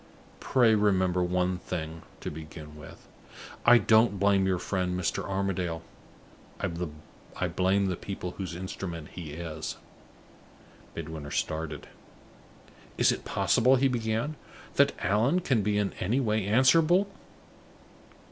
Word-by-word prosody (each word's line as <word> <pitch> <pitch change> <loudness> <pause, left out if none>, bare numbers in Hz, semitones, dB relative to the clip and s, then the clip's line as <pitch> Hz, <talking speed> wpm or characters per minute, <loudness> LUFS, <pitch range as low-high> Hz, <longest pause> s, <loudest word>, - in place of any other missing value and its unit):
Pray 120 -4 +3
remember 95 -4 +2
one 90 0 0
thing, 80 -2 -5 0.2
to - - -4
begin 75 -1 -9
with. 75 -1 -13 0.6
I 120 0 +9
don't 110 -3 +4
blame 100 -1 +3
your 95 -1 +1
friend, 90 0 -2
Mr. 90 - -1
Armadale. 95 -4 -2 0.8
I 85 -4 -5
blame 95 +2 +1
the 95 -2 0
people 90 -1 -6
whose 90 -2 -6
instrument 85 -3 -6
he 80 -5 -8
is." 80 -1 -5 1.2
Midwinter 80 -2 -6
started. 80 0 -3 1.1
"Is - - +5
it - - -4
possible," 130 +3 +3
he 135 +1 +3
began, 120 +4 -1 0.4
"that - - +4
Allan 110 - +3
can 130 -10 +1
be 105 +1 0
in 105 -1 0
any 110 +9 +1
way 110 -5 0
answerable 160 - +4
95 Hz, 120 wpm, -28 LUFS, 85-110 Hz, 1.2 s, I